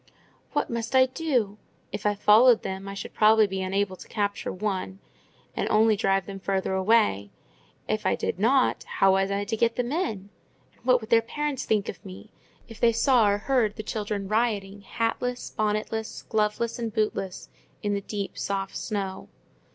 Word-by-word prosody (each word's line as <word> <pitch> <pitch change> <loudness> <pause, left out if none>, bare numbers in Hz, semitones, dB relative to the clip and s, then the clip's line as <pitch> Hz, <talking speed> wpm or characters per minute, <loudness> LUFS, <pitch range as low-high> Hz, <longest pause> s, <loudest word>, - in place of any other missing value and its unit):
What - - 0
must 235 +1 -3
I 260 0 +7
do? 255 -8 -1 0.3
If 205 +1 -2
I 205 - +1
followed 220 +4 +6
them, 190 +1 -5
I 195 - -6
should - - -7
probably 215 0 +5
be 190 -1 -3
unable 190 0 -1
to - - -13
capture 205 -2 -2
one, 190 -1 -3 0.6
and - - -1
only 220 0 +4
drive 195 -1 +1
them 195 0 -7
farther 190 0 -1
away; 190 - +2 0.6
if - - -1
I - - +2
did - - -3
not, 255 +5 +3
how 195 - +2
was 195 0 +2
I 200 0 -1
to 225 - -2
get 230 +1 +1
them 245 0 -2
in? 220 - -2 0.4
And - - -30
what 250 0 +4
would 220 +2 -10
their 230 0 +6
parents 290 +3 -3
think 210 -2 +1
of - - -7
me, 190 +2 -11 0.4
if 225 -2 -12
they 235 - +5
saw 230 -2 +4
or 200 - +2
heard 225 -2 +1
the 215 - -6
children 210 -2 -3
rioting, 205 -2 -1
hatless, 235 +4 -2
bonnetless, 215 +1 -2
gloveless, 220 +2 0
and 230 -1 -3
bootless, 210 -4 -2 0.3
in 205 0 0
the 200 - -1
deep 200 0 -5
soft 195 -1 -3
snow? 195 -3 -4
210 Hz, 180 wpm, -26 LUFS, 195-230 Hz, 0.6 s, I